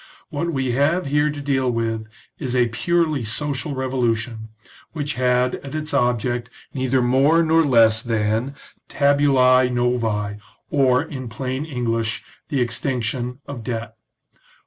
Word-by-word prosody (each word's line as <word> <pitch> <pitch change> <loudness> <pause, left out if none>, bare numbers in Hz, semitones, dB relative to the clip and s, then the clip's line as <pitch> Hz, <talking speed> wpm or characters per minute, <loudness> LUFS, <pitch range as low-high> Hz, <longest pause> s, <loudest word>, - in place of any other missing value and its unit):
What 170 +4 -2
we 135 -4 -1
have 145 +8 +1
here 145 +2 +2
to 150 -1 -5
deal 135 -2 +1
with 115 -2 -2 0.3
is 130 -4 -3
a 120 -2 +3
purely 155 +3 0
social 140 +5 -3
revolution, 120 -4 -1 0.4
which 145 -2 -3
had 125 0 +1
as 140 +1 -8
its 155 0 -4
object 120 -2 0 0.2
neither 130 -1 +1
more 140 +7 +4
nor 165 0 +4
less 115 -5 +4
than 115 +3 -1 0.2
" - - -39
tabulae 135 -3 +4
novael' 115 -4 -1 0.3
or, 130 -2 +3
in 130 -6 -7
plain 130 +5 -3
English, 115 -6 -2 0.3
the 140 -3 0
extinction 125 +1 -2
of 130 -5 -7
debt. 115 -1 -4
130 Hz, 135 wpm, -22 LUFS, 115-140 Hz, 0.4 s, more